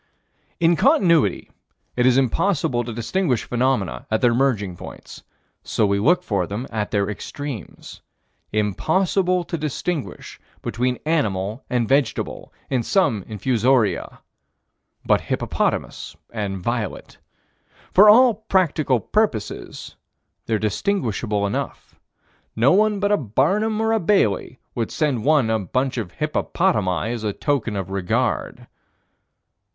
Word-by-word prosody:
In 170 0 +4
Continuity, 170 - +3 0.4
it 125 0 +3
is 130 0 +4
impossible 135 - +1
to 120 - -5
distinguish 125 - -1
phenomena 125 -5 -1
at 110 - +1
their 120 -2 +4
merging 115 -8 0
points, - - -11 0.4
so 110 - 0
we 100 0 +1
look 170 - +3
for 100 -5 -1
them 105 +6 -4
at 105 -2 -2
their 100 -2 0
extremes. 125 - -7 0.5
Impossible 180 - +1
to 170 -1 -5
distinguish 155 +1 -4 0.2
between 125 +3 -1
animal 110 - -1
and 120 -2 0
vegetable 135 -1 -1 0.2
in 130 -3 0
some 115 - +1
infusoria 115 -3 0 0.8
but - - +3
hippopotamus - - -2 0.2
and 100 -4 -3
violet. 115 -3 -4 0.7
For 210 +3 +8
all 245 +3 +7
practical 180 - +1
purposes 170 - -2 0.5
they're 110 - +1
distinguishable 110 - -1
enough. 100 - -5 0.6
No 120 +5 +4
one 210 +1 +3
but 205 +1 +1
a 205 - +4
Barnum 190 - 0
or 225 0 +1
a 225 - +2
Bailey 145 - +1 0.2
would 115 -2 -2
send 140 -8 -1
one 145 -6 +3
a 110 - +1
bunch 130 +6 -1
of 90 -6 -6
hippopotami 110 - 0
as 115 -2 -5
a 105 -2 -1
token 125 -6 -1
of 95 -1 -4
regard. 100 +4 -1
125 Hz, 125 wpm, -22 LUFS, 105-170 Hz, 0.8 s, For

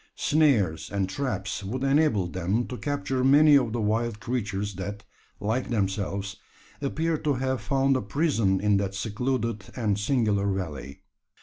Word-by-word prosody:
Snares 130 - +2
and 100 -2 0
traps 95 -3 -3
would 125 +7 -3
enable 135 - +3
them 95 +6 -1
to 125 - -6
capture 140 -1 -2
many 145 +3 +6
of 125 -5 +3
the 120 - -2
wild 110 +1 0
creatures 105 -4 -3
that, 100 +2 -6 0.4
like 110 +5 -1
themselves, 100 -2 -2 0.4
appeared 155 +3 -1
to 145 -3 +1
have 130 -2 -1
found 135 +5 +2
a 130 - 0
prison 110 - +1
in 105 0 +3
that 100 -1 -2
secluded 115 +1 -2
and 105 -5 0
singular 105 -4 +1
valley. 75 -8 -5
110 Hz, 145 wpm, -26 LUFS, 100-135 Hz, 0.4 s, many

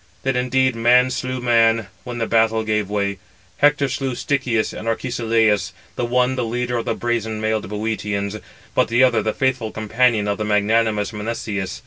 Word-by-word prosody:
Then 135 -1 0
indeed 130 0 +1
man 125 +2 +4
slew 130 0 -3
man, 115 -2 +3 0.2
when 120 -1 -5
the 115 - -1
battle 115 0 +2
gave 105 -2 -1
way. 100 -2 -1 0.4
Hector 145 -1 +3
slew 135 -1 -3
Stichius 125 -5 -1
and 110 - -7
Arcesilaus; 115 -5 +1 0.2
the 120 - -1
one 125 +1 +2
the 125 - -1
leader 120 +1 -2
of 115 - -3
the - - -1
brazen 110 -2 -2
mailed 110 -2 -1
Bœotians; 105 -1 -3 0.3
but - - +2
the 120 +3 +3
other 125 -3 +4
the 110 - 0
faithful 130 -2 -1
companion 110 0 +1
of 100 0 -1
magnanimous 105 0 +1
Menestheus. 105 -3 -4
115 Hz, 165 wpm, -21 LUFS, 110-125 Hz, 0.4 s, man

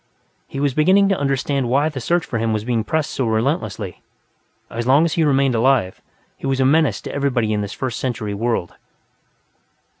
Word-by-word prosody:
He 135 - -6
was 140 -2 +1
beginning 190 +7 +4
to 195 - +1
understand 135 -2 0
why 140 +4 +2
the 145 -5 -5
search 170 +6 +1
for 115 - -3
him 115 0 0
was 105 -1 -2
being 115 -1 0
pressed 155 +5 -1
so 130 - -1
relentlessly; 110 - -2 0.7
as 120 +1 -4
long 140 +5 +5
as 165 - -1
he 165 - +1
remained 135 -3 +2
alive, 115 -5 +1 0.4
he - - -5
was 135 -1 0
a 130 - +3
menace 155 +2 +2
to - - -7
everybody 125 -6 0
in 105 - 0
this 100 +1 -5
First 130 -4 -4
Century 115 -5 -3
world. 115 -4 -2
130 Hz, 190 wpm, -20 LUFS, 115-145 Hz, 0.7 s, long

